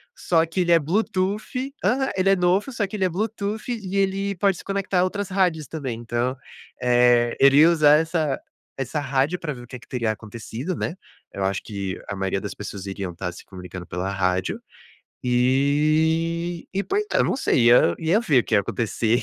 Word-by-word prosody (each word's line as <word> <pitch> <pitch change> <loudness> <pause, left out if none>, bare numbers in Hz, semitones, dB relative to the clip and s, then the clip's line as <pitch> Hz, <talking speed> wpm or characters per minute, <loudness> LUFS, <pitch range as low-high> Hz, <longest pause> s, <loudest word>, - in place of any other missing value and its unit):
só 165 - +2
que 165 +3 -4
ele 175 -1 +2
é 170 - +7
bluetooth 210 - -1
aham, 265 +1 +1
ele 190 +1 +2
é 195 - +5
novo 185 +7 +1
só 210 - 0
que 200 +2 -7
ele 190 - +1
é 185 - +1
bluetooth 210 +3 -3
e 200 -5 -4
ele 195 0 0
pode 195 0 +1
se - - -10
conectar 195 -2 -1
a 180 - +4
outras 200 +1 -2
rádios 180 -5 +1
também. 130 -8 -5
Então, 120 +2 -2 0.4
eh, 120 -1 +4
eu - - +6
iria 145 +4 +7
usar 150 -3 +6
essa 160 -3 0 0.4
essa 135 +3 -2
rádio 140 +5 0
pra 155 -2 -4
ver 125 - -10
o 120 - -13
que - - -9
é 125 - -8
que 120 - -18
teria 120 -3 -1
acontecido, 115 - -6
né. 165 - -3 0.4
Eu 100 - -3
acho 95 0 0
que 100 -3 -5
a 100 - -4
maioria 95 0 -1
das 100 0 -6
pessoas 100 -2 -7
iriam 95 -2 -4
estar 90 +1 -4
se - - -12
comunicando 90 -1 -9
pela 90 +3 -3
rádio. 95 -1 -1 0.6
E 155 +7 +1
e 195 - +1
poi 405 +2 0
ah, - - +2
eu - - +4
não - - 0
sei, 125 - +2
ia 85 -8 +5
ia 170 +7 +2
ver 145 - +3
o - - -5
que 110 - -1
ia - - +5
acontecer. 115 +2 0
150 Hz, 210 wpm, -23 LUFS, 120-190 Hz, 0.6 s, é